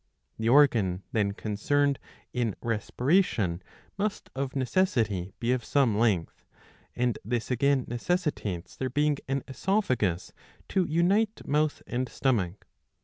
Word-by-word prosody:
The 110 +1 +1
organ 115 -10 +4
then 105 -5 +1
concerned 140 +8 0 0.3
in 120 -5 0
respiration 115 - +1 0.4
must 210 0 -2
of 135 0 -3
necessity 120 - +1
be 120 +1 0
of 125 -1 0
some 135 -7 +2
length; 105 -7 0 0.5
and 125 -2 0
this 120 +3 -2
again 135 +1 +2
necessitates 120 - -2
there 130 - -2
being 145 +2 +1
an 135 0 -1
oesophagus 130 - 0 0.4
to 190 -2 +2
unite 195 +7 +1
mouth 150 +1 0
and 125 0 -2
stomach. 105 -8 -1
125 Hz, 120 wpm, -28 LUFS, 110-145 Hz, 0.5 s, organ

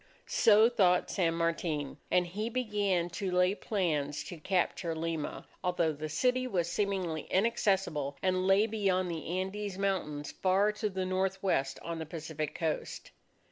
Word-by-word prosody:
So 220 0 +5
thought 185 -7 +3
San 170 -4 +1
Martin; 165 -3 -1
and 180 0 +3
he 210 +6 -3
began 205 -7 0
to 190 +2 -3
lay 180 +1 +3
plans 150 -9 -1
to 175 - -8
capture 175 0 0
Lima, 160 -1 -3 0.2
although 175 -3 +1
the 155 +1 -5
city 255 - +1
was 175 -8 0
seemingly 185 -4 -1
inaccessible 190 -9 +1
and 185 0 +1
lay 195 +2 +5
beyond 195 -5 0
the 160 -2 -5
Andes 195 +1 -4
Mountains 165 -7 -2
far 195 +3 +2
to 210 0 -2
the 190 -1 -2
northwest 185 -6 0
on 170 -1 -4
the 160 - -5
Pacific 160 -2 -5
Coast. 160 -2 -3
185 Hz, 145 wpm, -31 LUFS, 165-200 Hz, 0.2 s, So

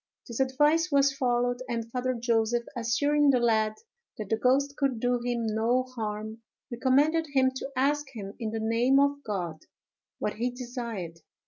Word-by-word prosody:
This 235 0 -6
advice 295 +5 +2
was 280 -1 +4
followed; 245 -1 0
and 230 -1 -3
Father 255 +1 -1
Joseph, 235 0 +1
assuring 285 +5 +2
the 260 -2 +4
lad 220 -2 +2 0.4
that 210 -2 -6
the 220 - +3
ghost 270 +5 +2
could 275 -5 0
do 245 +1 +1
him 240 -1 -2
no 225 +4 +1
harm, 220 -3 -5 0.3
recommended 285 +7 +2
him 260 -1 +4
to 270 - -5
ask 290 +2 +1
him, 200 -4 -7
in 225 -2 -2
the 225 +1 -3
name 235 +5 +3
of 285 0 +2
God, 175 -7 -4 0.6
what 210 - -2
he 240 +3 0
desired. 235 -9 -6
245 Hz, 160 wpm, -28 LUFS, 225-270 Hz, 0.6 s, was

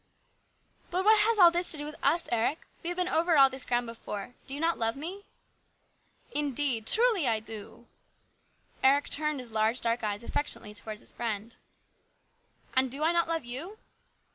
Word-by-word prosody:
" - - -37
But 370 +2 -1
what 435 0 +6
has 440 +1 +2
all 350 -4 +8
this 350 +1 +2
to 315 - 0
do 295 - -5
with 300 - -6
us, 340 +1 +2
Eric? 235 +7 0 0.2
We - - -5
have 355 - -4
been 360 -1 +1
over 330 -1 +2
all 270 -1 +7
this 265 0 0
ground 245 0 0
before. 230 -1 -7
Do 270 - -5
you - - -6
not 330 +1 0
love 225 0 +1
me? 360 +8 -7 0.4
" - - -43
" - - -42 0.3
Indeed, 275 - +1
truly 445 - +4
I 225 -2 +2
do! 220 +2 -9 0.5
" - - -37
v - - +5
Eric 285 +2 +3
turned 300 -1 0
his 245 -3 -7
large 220 +3 +1
dark 230 0 -1
eyes 210 +1 -2
affectionately 235 -5 -2
towards 215 +1 -5
his - - -7
friend. 225 -1 -4 0.6
" - - -32
And 260 0 +3
do 275 +4 -2
I 325 - +3
not 340 0 +1
love 330 -5 -2
you 300 - -6
275 Hz, 205 wpm, -29 LUFS, 230-335 Hz, 0.6 s, all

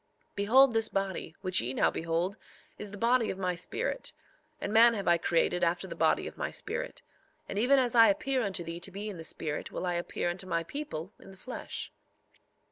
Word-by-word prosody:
3:16 - - -42
Behold, 240 +6 +5
this 225 0 +2
body, 195 -4 -3
which 185 -1 +2
ye 125 +3 -3
now - - +3
behold, 165 +4 -1 0.4
is 210 - -6
the 205 - -9
body 235 +1 +3
of 190 - -3
my 185 -2 0
spirit; 475 - -3 0.5
and - - -3
man 230 +1 +7
have 200 - -4
I 170 0 +5
created 175 +2 +1
after 175 +2 +1
the - - -6
body - - +2
of - - -8
my - - -1
spirit; - - -5 0.4
and 200 - -3
even 260 +5 +5
as 250 -3 +2
I 230 -1 +8
appear 285 -3 +1
unto 195 -5 -2
thee 165 +1 -5
to 175 - -3
be 200 +3 -5
in 200 - -7
the 165 - -7
spirit 155 -2 -4
will - - -4
I 180 - 0
appear 175 0 -1
unto 185 +2 -6
my 165 -2 0
people 190 - -6
in - - -14
the 190 - -13
flesh. 250 +6 -6
195 Hz, 215 wpm, -30 LUFS, 175-230 Hz, 0.5 s, I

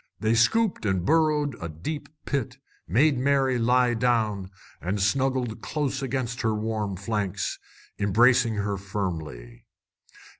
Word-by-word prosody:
They 110 +1 +1
scooped 210 - +2
and 95 -4 0
burrowed 150 -2 +2
a 85 - -4
deep 90 - -6 0.2
pit, 140 -6 -2 0.3
made 130 - +3
Mary 135 -2 +2
lie 125 +1 +3
down, 110 -5 0 0.3
and 95 +4 -2
snuggled 130 +2 0
close 140 -3 -2
against 130 -2 -2
her 110 -2 +1
warm 105 -2 -2
flanks, 100 -1 -2 0.4
embracing 115 +3 +4
her 100 -1 -1
firmly. 80 -12 -5
115 Hz, 120 wpm, -26 LUFS, 100-130 Hz, 0.4 s, embracing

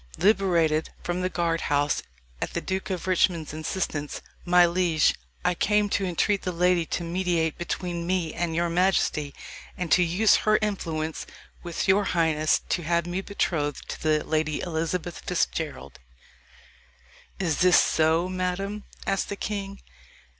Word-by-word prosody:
"Liberated 170 -6 +2
from 175 +1 -2
the 185 - 0
guard 170 -2 0
house 145 0 +1 0.4
at - - -3
the - - +1
Duke 190 0 -3
of 185 -1 -3
Richmond's 175 -4 +1
instance, 155 -2 -3 0.2
my 175 0 +6
liege, 170 -3 +2 0.3
I 180 - +3
came 210 +3 +2
to 200 - 0
entreat 190 +3 +1
the 180 - -2
Lady 180 0 +3
Anne 165 - -5
to 175 - -2
mediate 170 -2 0
between 175 0 -3
me 180 -3 0
and 170 -1 -2
your 170 +1 +1
majesty, 170 -4 +1 0.5
and 180 -2 -4
to 180 - +6
use 180 +5 +4
her 215 0 +3
influence 165 -7 -3 0.3
with 170 -2 -3
your 195 +2 +4
highness 160 -4 +2
to 175 - 0
have 170 +1 0
me 175 +2 -2
betrothed 155 -8 -2
to - - -6
the 155 -1 +2
Lady 155 -1 0
Elizabeth 170 +1 -3
Fitzgerald." 150 - -3 1.4
"Is 170 -5 0
this 180 0 +6
so, 160 +2 +2
madam?" 185 +3 -3 0.2
asked 195 -1 0
the 200 - -3
king. 200 -1 -5
175 Hz, 150 wpm, -26 LUFS, 160-185 Hz, 1.4 s, my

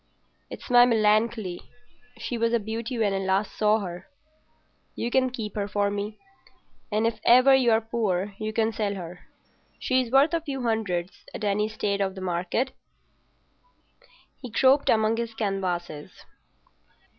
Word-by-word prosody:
It's - - -9
my 245 0 +8
Melancolia; 215 -4 +1 0.6
she 245 - -4
was 230 0 0
a 235 - +3
beauty 225 +3 -4
when 210 -3 +1
I 195 - -1
last 195 +2 -1
saw 215 0 +2
her. 180 -2 -7 0.9
You 235 - -3
can 260 0 +2
keep 220 -5 -6
her 200 -1 -2
for 205 0 0
me, 205 +1 -4 0.7
and 215 +2 +1
if 230 -1 -1
ever 255 +3 +6
you're 240 -4 +4
poor 210 -4 -2
you 215 0 -3
can 225 0 0
sell 205 -2 -2
her. 180 -1 -9 0.5
She's 255 -2 0
worth 275 +6 +4
a 335 - +1
few 275 -5 -5
hundreds 200 -6 -2
at - - -6
any 210 +1 0
state 200 -2 -2
of 190 -1 -1
the - - -7
market." 185 +8 -1 1.7
He 250 - -7
groped 265 +5 +3
among 220 0 +3
his 230 -1 -4
canvases. 180 -7 -3
215 Hz, 150 wpm, -26 LUFS, 200-235 Hz, 1.7 s, my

